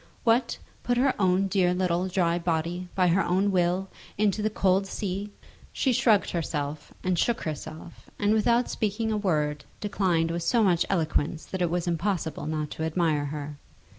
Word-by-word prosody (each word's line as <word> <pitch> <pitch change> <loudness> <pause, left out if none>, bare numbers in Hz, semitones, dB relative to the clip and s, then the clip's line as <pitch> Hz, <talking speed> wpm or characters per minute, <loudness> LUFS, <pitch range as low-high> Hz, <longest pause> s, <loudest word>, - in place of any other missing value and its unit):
What, 230 +2 +2 0.2
put 245 0 0
her 260 +1 +3
own 185 +1 +3
dear 185 -2 +2
little 180 0 0
dry 175 -2 +1
body, 170 +1 -2
by 185 -2 +3
her 185 +3 +3
own 190 +3 +1
will, 180 +1 +1 0.3
into 210 0 +1
the 215 - +1
cold 195 -2 +2
sea! 200 +1 -4 0.4
She 260 - +1
shrugged 220 -3 +3
herself, 150 -3 -3
and 180 -2 +1
shook 235 - +1
herself, 155 +2 -7
and 205 +1 +2
without 235 +3 +3
speaking 220 +1 -1
a 215 - +1
word 150 -7 0 0.2
declined 185 -5 0
with 170 +1 -2
so 230 +6 +2
much 180 -4 +2
eloquence 160 -3 0
that 190 - -5
it 175 - +2
was 175 0 -1
impossible 170 -3 -2
not 155 -1 -2
to 160 - -4
admire 160 -2 +1
her. 145 0 -6
180 Hz, 170 wpm, -27 LUFS, 165-200 Hz, 0.4 s, her